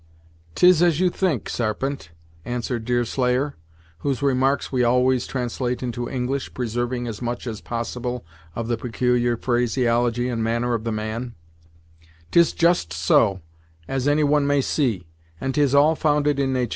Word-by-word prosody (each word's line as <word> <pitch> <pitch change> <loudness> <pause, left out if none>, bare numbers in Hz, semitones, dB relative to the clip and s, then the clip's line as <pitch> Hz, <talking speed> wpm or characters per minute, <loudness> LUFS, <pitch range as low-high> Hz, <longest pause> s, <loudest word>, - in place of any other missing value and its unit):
"'Tis 180 -2 +6
as 170 -3 +3
you 180 -1 +3
think, 170 - -1
Sarpent," 120 - -2 0.3
answered 120 0 -3
Deerslayer, 125 +3 0 0.4
whose 140 +4 -2
remarks 135 0 +1
we 125 -2 +1
always 125 +1 +2
translate 125 0 -3
into 120 -1 -3
English, 130 +1 -3
preserving 120 +1 -2
as 115 -2 -6
much 120 0 -3
as 110 -3 -5
possible 120 0 -4 0.3
of 115 -1 -3
the 120 -1 0
peculiar 120 0 0
phraseology 120 0 +1
and 115 -3 -2
manner 115 +2 0
of 115 -1 -2
the 115 - -1
man, 110 +3 -4 1.0
"'Tis 170 -1 +5
just 170 - +2
so, 90 +4 +2 0.5
as 135 0 -1
any 150 +1 +3
one 145 0 +2
may 145 0 +3
see, 125 - 0 0.3
and 135 0 -2
'tis 140 -1 +2
all 150 +3 +5
founded 150 -2 +1
in 135 -1 +1
natur'. 125 -3 0
125 Hz, 150 wpm, -23 LUFS, 120-140 Hz, 1.0 s, Tis